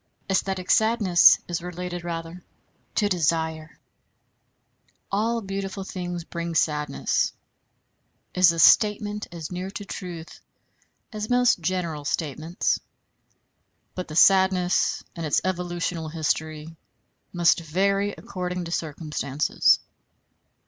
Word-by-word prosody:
Æsthetic 190 -1 -1
sadness 220 -6 +5
is 175 -1 -3
related 180 0 -6
rather 170 +1 -6 0.5
to 210 - +2
desire. 160 -3 -1 1.3
"All 225 +4 0
beautiful 195 0 -4
things 175 -2 -5
bring 170 0 -5
sadness," 150 -2 0 1.0
is 180 -2 +6
a 165 - -5
statement 210 +4 +4
as 165 -2 -7
near 180 +1 -4
to 205 +1 -7
truth 175 -4 -8 0.7
as 215 0 -4
most 245 -4 +3
general 170 -3 -2
statements; 155 +3 -1 1.1
but 185 - -5
the 155 - -8
sadness 190 0 +4
and 170 - -5
its 150 - +2
evolutional 175 -3 -2
history 155 0 -3 0.6
must 175 -1 +3
vary 195 +5 0
according 180 -1 -5
to 165 - -7
circumstances. 150 -3 0
175 Hz, 100 wpm, -25 LUFS, 165-190 Hz, 1.3 s, is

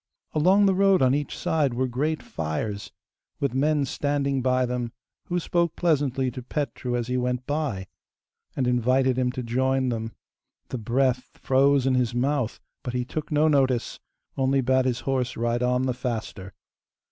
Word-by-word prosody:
Along 185 +7 +4
the 195 - +4
road 195 -4 +4
on 130 0 +4
each 145 0 -2
side 145 -6 0
were 130 +1 0
great 150 +6 -1
fires, 100 +7 -4 0.5
with 140 -4 0
men 145 +2 +2
standing 140 0 -1
by 130 0 +2
them, 120 -1 -3 0.3
who 175 0 -1
spoke 170 -1 0
pleasantly 135 -6 +1
to 125 - -7
Petru 125 -2 -3
as 120 -1 -1
he 125 +1 -1
went 125 0 -1
by, 145 -11 -2 0.7
and 130 - 0
invited 125 +2 +2
him 125 -1 +1
to 130 - -4
join 130 +2 +1
them. 115 -1 -3 0.6
The 130 - -4
breath 125 +3 0
froze 135 0 +3
in 135 - +3
his 125 -2 +1
mouth, 130 -1 0 0.2
but 125 -2 -5
he 125 0 -1
took 155 +5 -5
no 150 +1 +3
notice, 130 -5 +1 0.4
only 135 0 +2
bade 130 0 +2
his 125 -1 0
horse 130 -2 -1
ride 120 +1 0
on 125 +1 +1
the 130 -1 0
faster. 110 -6 -5
130 Hz, 170 wpm, -25 LUFS, 125-140 Hz, 0.7 s, Along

